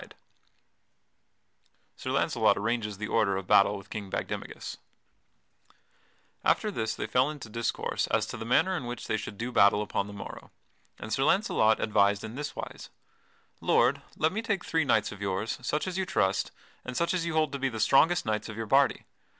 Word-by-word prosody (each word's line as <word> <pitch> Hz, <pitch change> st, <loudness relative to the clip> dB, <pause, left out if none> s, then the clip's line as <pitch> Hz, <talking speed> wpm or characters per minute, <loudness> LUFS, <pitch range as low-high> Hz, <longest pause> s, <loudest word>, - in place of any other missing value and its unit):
[Sidenote: -, -, -14 dB, 1.8 s
Sir -, -, -6 dB
Launcelot -, -, +2 dB
arranges 110 Hz, -3 st, -1 dB
the 110 Hz, +2 st, -4 dB
order 100 Hz, -4 st, +2 dB
of 95 Hz, -, -5 dB
battle 100 Hz, +2 st, +4 dB
with 100 Hz, -, -13 dB
King 100 Hz, -3 st, -5 dB
Bagdemagus] -, -, -5 dB, 1.7 s
After -, -, +2 dB
this 110 Hz, -1 st, -2 dB
they -, -, -3 dB
fell 130 Hz, +3 st, +2 dB
into 145 Hz, -7 st, -8 dB
discourse 115 Hz, +1 st, -1 dB
as -, -, +1 dB
to -, -, -6 dB
the -, -, -6 dB
manner 185 Hz, +10 st, +3 dB
in 135 Hz, -8 st, -4 dB
which 120 Hz, -1 st, -6 dB
they -, -, 0 dB
should 105 Hz, -1 st, -5 dB
do 120 Hz, +3 st, -3 dB
battle 100 Hz, -1 st, +5 dB
upon 100 Hz, -1 st, -2 dB
the 105 Hz, -, -9 dB
morrow, 100 Hz, -, -9 dB, 0.5 s
and 110 Hz, -, -5 dB
Sir -, -, 0 dB
Launcelot 140 Hz, -, +3 dB
advised 100 Hz, -2 st, +2 dB
in 110 Hz, 0 st, -6 dB
this 145 Hz, +3 st, -5 dB
wise: -, -, -7 dB, 0.7 s
"Lord, -, -, +3 dB, 0.2 s
let 160 Hz, +1 st, +2 dB
me 215 Hz, -, -2 dB
take 205 Hz, -5 st, -2 dB
three 160 Hz, -2 st, +1 dB
knights 110 Hz, -6 st, +2 dB
of 100 Hz, -1 st, -10 dB
yours, 100 Hz, +2 st, -2 dB
such 150 Hz, -, -1 dB
as 185 Hz, 0 st, -3 dB
you 190 Hz, -, 0 dB
trust, 95 Hz, 0 st, +1 dB, 0.3 s
and 125 Hz, 0 st, -5 dB
such 170 Hz, +1 st, +1 dB
as 170 Hz, -2 st, -1 dB
you 170 Hz, -, -2 dB
hold 155 Hz, -3 st, +2 dB
to 140 Hz, -, -4 dB
be 135 Hz, 0 st, 0 dB
the 110 Hz, -3 st, -6 dB
strongest 160 Hz, +9 st, +4 dB
knights 110 Hz, 0 st, -2 dB
of 110 Hz, -, -7 dB
your 115 Hz, -, -3 dB
party. 135 Hz, +5 st, +3 dB
115 Hz, 190 wpm, -28 LUFS, 105-150 Hz, 1.8 s, battle